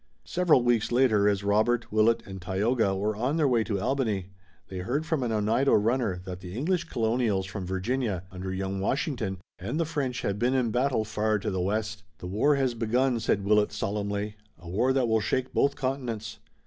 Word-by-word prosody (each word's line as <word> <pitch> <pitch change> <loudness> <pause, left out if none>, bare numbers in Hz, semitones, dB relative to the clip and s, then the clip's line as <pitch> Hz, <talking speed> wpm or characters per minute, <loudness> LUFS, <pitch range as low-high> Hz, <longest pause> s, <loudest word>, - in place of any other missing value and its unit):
Several 175 -8 +3
weeks 120 -2 +2
later, 115 -5 +4
as 100 -1 0
Robert, 110 +4 +1
Willet, 110 +2 +3
and 95 -1 -8
Tayoga 100 +3 +1
were 105 +2 -1
on 125 +8 0
their 155 -3 +3
way 120 -4 +3
to 100 -3 -1
Albany, 105 -6 -1 0.4
they 95 - -6
heard 130 - -2
from 160 -3 0
an 120 -2 -1
Oneida 110 +5 +3
runner 110 -3 0
that 90 -1 -6
the 90 +2 -8
English 170 +5 0
colonials 115 - 0
from 95 -1 -6
Virginia, 95 0 -1
under 95 0 -5
young 95 +1 -3
Washington, 120 - -1 0.2
and 115 - -3
the 165 - +2
French 140 -5 -2
had 100 0 -1
been 125 +3 +2
in 125 -4 +1
battle 125 -2 +1
far 110 0 0
to 100 - -3
the 95 -1 -1
west. 105 +1 -2 0.2
"The - - -9
war 110 +11 +2
has 135 -3 +1
begun," 120 +2 +1
said 100 -3 0
Willet 105 0 +3
solemnly, 105 +1 -3 0.2
"a 85 +1 -14
war 110 +9 +1
that 130 -2 +2
will 110 -1 +2
shake 130 +5 -1
both 140 0 +2
continents." 120 -6 -3
110 Hz, 195 wpm, -27 LUFS, 100-130 Hz, 0.4 s, later